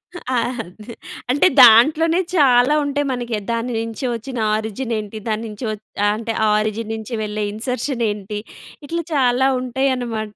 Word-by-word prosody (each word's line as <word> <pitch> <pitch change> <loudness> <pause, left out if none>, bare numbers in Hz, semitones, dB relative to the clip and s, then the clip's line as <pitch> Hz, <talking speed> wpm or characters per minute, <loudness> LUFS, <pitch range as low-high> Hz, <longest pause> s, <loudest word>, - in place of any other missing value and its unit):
ఆ! 260 -7 -4 0.3
అదే 210 +6 -12 0.4
అంటే, 285 +7 +4
దాంట్లోనే 305 +9 +6 0.2
చాలా 260 -2 +5
ఉంటయి 285 0 -1
మనకె. 240 -3 -3
దాని 230 +1 -2
నించి 230 +3 -4
ఒచ్చిన 245 +2 -7 0.2
ఆరిజినేంటి, 220 0 -3
దాని 220 0 -1
నించి 210 +3 -7
ఒ - - -2 0.4
అంటే, 225 +1 -4
ఆ - - +3
ఆరిజిన్ 215 +1 -3
నించి 220 +2 -5
వెళ్ళే 210 0 -3
ఇన్సర్షనేంటి, 220 -4 -3 0.5
ఇట్లా 335 +2 -2
చాలా 260 -2 +3
ఉంటాయనమాట. 245 -4 -2
235 Hz, 135 wpm, -20 LUFS, 215-265 Hz, 0.5 s, దాంట్లోనే